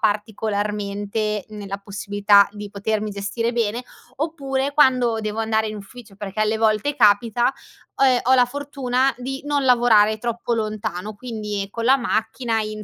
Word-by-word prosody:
particolarmente 210 Hz, -1 st, -2 dB
nella 200 Hz, -2 st, -6 dB
possibilità 200 Hz, 0 st, +3 dB
di 205 Hz, -1 st, -8 dB
potermi 210 Hz, +1 st, -2 dB
gestire 205 Hz, +4 st, -2 dB
bene; 230 Hz, 0 st, -1 dB, 0.3 s
oppure 280 Hz, -3 st, -2 dB
quando 255 Hz, -5 st, +3 dB
devo 215 Hz, +1 st, -3 dB
andare 220 Hz, 0 st, +1 dB
in 215 Hz, -, -5 dB
ufficio, 210 Hz, +1 st, -11 dB
perché 200 Hz, +1 st, -8 dB
alle 215 Hz, +1 st, +1 dB
volte 220 Hz, +6 st, +1 dB
capita, 230 Hz, +4 st, +3 dB, 0.4 s
ho, 275 Hz, -, +3 dB
ehm, 255 Hz, -2 st, +4 dB
ho 260 Hz, +2 st, +4 dB
la 250 Hz, -, +6 dB
fortuna 270 Hz, -1 st, -1 dB
di 270 Hz, +2 st, -5 dB
non 290 Hz, -1 st, 0 dB
lavorare 225 Hz, -4 st, +4 dB
troppo 235 Hz, +1 st, -2 dB
lontano, 215 Hz, -2 st, -4 dB
quindi 210 Hz, -4 st, -4 dB
con 230 Hz, 0 st, -4 dB
la 265 Hz, +2 st, +6 dB
macchina, 230 Hz, -1 st, -1 dB
in 215 Hz, 0 st, -5 dB
220 Hz, 150 wpm, -22 LUFS, 210-245 Hz, 0.4 s, la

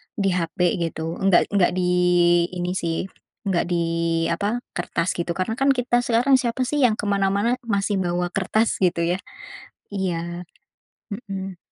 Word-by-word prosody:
di 195 Hz, -2 st, +1 dB
hape, 180 Hz, 0 st, 0 dB
gitu. 160 Hz, +1 st, -5 dB
Nggak 195 Hz, -2 st, +3 dB
nggak 200 Hz, -3 st, +3 dB
di 180 Hz, -1 st, +1 dB, 0.6 s
ini, 180 Hz, 0 st, -2 dB
sih. 165 Hz, -1 st, -2 dB, 0.4 s
Nggak 185 Hz, -3 st, +1 dB
di, 170 Hz, -1 st, +1 dB, 0.5 s
apa, 205 Hz, +8 st, -1 dB, 0.2 s
kertas 175 Hz, 0 st, -1 dB
gitu. 170 Hz, 0 st, -2 dB
Karena, 190 Hz, +5 st, -2 dB
kan, 275 Hz, 0 st, +4 dB
kita 245 Hz, -1 st, +1 dB
sekarang 245 Hz, +4 st, +3 dB
siapa, 245 Hz, +1 st, -1 dB
sih, 295 Hz, +4 st, -1 dB
yang 225 Hz, -3 st, +4 dB
ke -, -, -3 dB
mana-mana 200 Hz, +4 st, +1 dB
masih 200 Hz, -2 st, 0 dB
bawa 175 Hz, 0 st, -1 dB
kertas, 215 Hz, +4 st, 0 dB
gitu, 175 Hz, -2 st, +2 dB
ya. 175 Hz, +2 st, 0 dB, 0.7 s
Iya. 175 Hz, -2 st, -3 dB, 0.7 s
Mmm. 195 Hz, -4 st, -6 dB
190 Hz, 150 wpm, -23 LUFS, 175-215 Hz, 0.7 s, kan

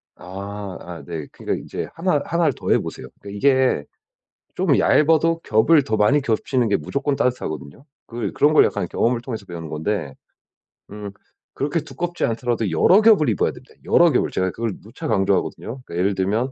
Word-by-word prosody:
아 100 Hz, +1 st, -7 dB
아 85 Hz, -1 st, -9 dB
네 80 Hz, -4 st, -6 dB
그러니까 -, -, -4 dB
인제 -, -, -5 dB
하나 165 Hz, -4 st, 0 dB
하나를 170 Hz, -5 st, +1 dB
더해 -, -, +1 dB
보세요. -, -, -7 dB
그 100 Hz, -, -9 dB
이게 130 Hz, -, +2 dB, 0.7 s
좀 -, -, +2 dB
얇아도 165 Hz, +2 st, +3 dB
겹을 140 Hz, +8 st, +4 dB
더 110 Hz, -4 st, -1 dB
많이 135 Hz, +8 st, +3 dB
겹치는 120 Hz, -1 st, 0 dB
게 100 Hz, -, +3 dB
무조건 140 Hz, -, -2 dB
따뜻하거든요. 125 Hz, -, -3 dB, 0.2 s
그 115 Hz, -4 st, -4 dB
그런 150 Hz, +2 st, +3 dB
걸 -, -, +7 dB
약간 -, -, -2 dB
경험을 120 Hz, 0 st, 0 dB
통해서 115 Hz, -5 st, -6 dB
배우는 85 Hz, -3 st, -7 dB
건데. 80 Hz, -2 st, -3 dB, 0.8 s
음 105 Hz, 0 st, -7 dB, 0.4 s
그렇게 145 Hz, +4 st, -1 dB
두껍지 175 Hz, +2 st, -3 dB
않더라도 115 Hz, -2 st, -1 dB
여러 180 Hz, -, +5 dB
겹을 210 Hz, -, +5 dB
입어야 105 Hz, -, +1 dB
됩니다, -, -, -16 dB
여러 170 Hz, -1 st, +5 dB
겹을. 125 Hz, -, +1 dB
제가 95 Hz, 0 st, 0 dB
그걸 115 Hz, +1 st, -3 dB
누차 130 Hz, +9 st, -8 dB
강조하거든요. 95 Hz, -6 st, 0 dB, 0.2 s
그러니까 85 Hz, -, -9 dB
예를 95 Hz, +3 st, +1 dB
들면 105 Hz, +8 st, 0 dB
115 Hz, 385 characters per minute, -22 LUFS, 95-145 Hz, 0.8 s, 걸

